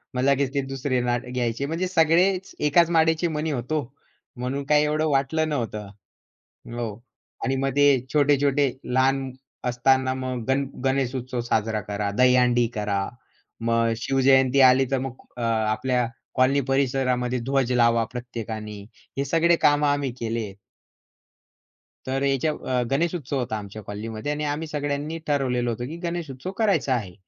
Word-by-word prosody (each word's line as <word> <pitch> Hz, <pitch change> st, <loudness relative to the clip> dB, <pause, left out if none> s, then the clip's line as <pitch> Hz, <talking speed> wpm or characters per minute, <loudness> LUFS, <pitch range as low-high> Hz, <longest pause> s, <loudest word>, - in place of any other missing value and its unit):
मग 125 Hz, -, 0 dB
लगेच 140 Hz, 0 st, +2 dB
ते 140 Hz, -, +2 dB
दुसरे 130 Hz, -1 st, -1 dB
नाट 120 Hz, 0 st, -1 dB
घ्यायचे. 120 Hz, +1 st, -1 dB
म्हणजे 165 Hz, +5 st, -2 dB
सगळेच 180 Hz, +2 st, +2 dB
एकाच 170 Hz, +3 st, +4 dB
माळेचे 160 Hz, +1 st, +3 dB
मणी 155 Hz, +1 st, -1 dB
होतो. 140 Hz, +3 st, -1 dB, 0.6 s
म्हणून 130 Hz, +3 st, -3 dB
काय 150 Hz, 0 st, +5 dB
एवढं 155 Hz, +1 st, +1 dB
वाटलं 145 Hz, +3 st, +1 dB
नव्हतं. 115 Hz, -7 st, -3 dB, 0.9 s
हो. 120 Hz, -1 st, -2 dB, 0.6 s
आणि 135 Hz, -, 0 dB
मग 135 Hz, 0 st, 0 dB
ते 145 Hz, 0 st, +6 dB, 0.3 s
छोटे-छोटे 145 Hz, -1 st, +3 dB
लहान 135 Hz, +1 st, +1 dB, 0.3 s
असताना 130 Hz, +1 st, +2 dB
मग 130 Hz, -2 st, -4 dB
गण 135 Hz, +1 st, +2 dB, 0.2 s
गणेश 135 Hz, -1 st, +1 dB
उत्सव 125 Hz, -1 st, -3 dB
साजरा 110 Hz, 0 st, 0 dB
करा, 105 Hz, 0 st, -3 dB
दहीहंडी 125 Hz, -1 st, +4 dB
करा. 105 Hz, -2 st, -1 dB, 0.6 s
मग 115 Hz, 0 st, +2 dB
शिवजयंती 135 Hz, +2 st, +3 dB
आली 130 Hz, +1 st, +4 dB
तर 135 Hz, -, +2 dB
मग 135 Hz, -1 st, -4 dB, 0.2 s
अ, -, -, -5 dB
आपल्या 115 Hz, +2 st, +1 dB, 0.3 s
कॉलनी 135 Hz, +2 st, +3 dB
परिसरामध्ये 130 Hz, -2 st, +1 dB
ध्वज 130 Hz, +1 st, 0 dB
लावा 115 Hz, -1 st, +4 dB
प्रत्येकाने. 110 Hz, -4 st, -6 dB, 0.4 s
हे 140 Hz, -, 0 dB
सगळे 165 Hz, +4 st, +3 dB
कामं 145 Hz, 0 st, +4 dB
आम्ही 145 Hz, -2 st, 0 dB
केलेत. 115 Hz, -3 st, -3 dB, 1.5 s
तर 135 Hz, +1 st, -1 dB
याच्या 140 Hz, +2 st, +1 dB
अ, 130 Hz, -4 st, -2 dB
गणेशोत्सव 150 Hz, -1 st, -1 dB
होता 120 Hz, -3 st, -2 dB
आमच्या 105 Hz, +1 st, -8 dB
कॉलनीमध्ये 110 Hz, +6 st, -5 dB
आणि 150 Hz, +1 st, -3 dB
आम्ही 150 Hz, +2 st, -2 dB
सगळ्यांनी 145 Hz, +1 st, -3 dB
ठरवलेलं 125 Hz, -4 st, 0 dB
होतं, 120 Hz, +1 st, -3 dB
की 160 Hz, +4 st, -7 dB
गणेश 170 Hz, -2 st, -3 dB
उत्सव 130 Hz, +8 st, -6 dB
करायचा 200 Hz, -, +2 dB
आहे. 100 Hz, -7 st, -4 dB
130 Hz, 145 wpm, -24 LUFS, 120-145 Hz, 1.5 s, ते